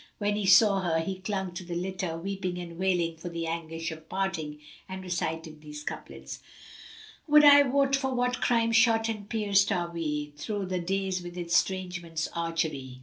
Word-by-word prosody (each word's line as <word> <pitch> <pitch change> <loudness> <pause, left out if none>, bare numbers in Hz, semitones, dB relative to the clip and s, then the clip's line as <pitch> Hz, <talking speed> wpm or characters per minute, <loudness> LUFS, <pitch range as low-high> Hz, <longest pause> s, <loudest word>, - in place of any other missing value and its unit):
When 205 0 0
he 205 -2 -1
saw 200 +1 +6
her, 170 -3 +1
he 185 +3 -3
clung 190 -2 -3
to 185 +1 -6
the 175 -1 -5
litter, 185 -1 -3
weeping 185 0 -3
and 170 -1 -7
wailing 175 -3 +1
for 175 +2 -6
the 170 -1 -4
anguish 165 0 -4
of 160 0 -11
parting, 165 -6 -2 0.3
and 190 0 -6
recited 160 -3 -3
these 150 -1 -9
couplets, - - -7 0.9
"Would 300 0 +7
I 285 0 +10
wot 275 0 +2
for 270 -1 -1
what 250 0 0
crime 230 -1 +2
shot 225 -1 +4
and 210 -2 -5
pierced 205 -3 +2
are 175 -3 -1
we 150 -3 -3
* - - -26
Thro' 200 +6 -3
the 185 0 -2
days 190 +1 -1
with 175 0 -9
Estrangement's 175 -1 -1
archery! 160 -6 -2
180 Hz, 180 wpm, -28 LUFS, 165-205 Hz, 0.9 s, I